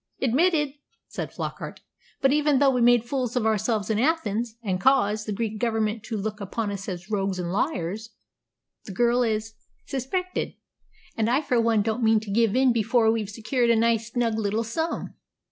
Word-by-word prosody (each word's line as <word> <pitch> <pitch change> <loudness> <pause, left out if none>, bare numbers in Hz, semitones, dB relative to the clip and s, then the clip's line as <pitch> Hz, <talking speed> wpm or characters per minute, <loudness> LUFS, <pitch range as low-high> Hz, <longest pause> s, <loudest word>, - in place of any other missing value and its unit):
"Admitted," 295 +3 +2 0.4
said - - -5
Flockart. - - -6 0.4
"But 270 - +4
even 295 -1 +3
though 275 0 +4
we 250 -2 0
made 240 -1 +5
fools 250 -1 -2
of 245 -3 +1
ourselves 220 0 0
in 215 - +1
Athens, 235 -6 0
and 190 -3 -1
caused 215 -4 +3
the - - -2
Greek 215 +1 -3
Government 225 -1 0
to 225 - -3
look 210 +1 -4
upon 205 +2 -3
us 195 0 -5
as 180 +3 -7
rogues 195 -2 0
and 175 -1 -3
liars, 215 - -2 0.8
the 195 - -7
girl 240 +4 +2
is 220 -1 -1 0.3
suspected; 365 +8 -3 0.6
and 225 -1 +1
I 255 +4 +3
for 255 -6 +1
one 225 -2 +2
don't 220 +3 -1
mean 220 -1 +4
to 215 -2 -7
give 225 0 +2
in 260 -1 +4
before 225 0 +3
we've 220 -3 -2
secured 235 +3 0
a 235 - +5
nice, 230 0 +1
snug 230 -2 0
little 215 +2 0
sum." 320 +9 -3
225 Hz, 180 wpm, -25 LUFS, 215-250 Hz, 0.8 s, made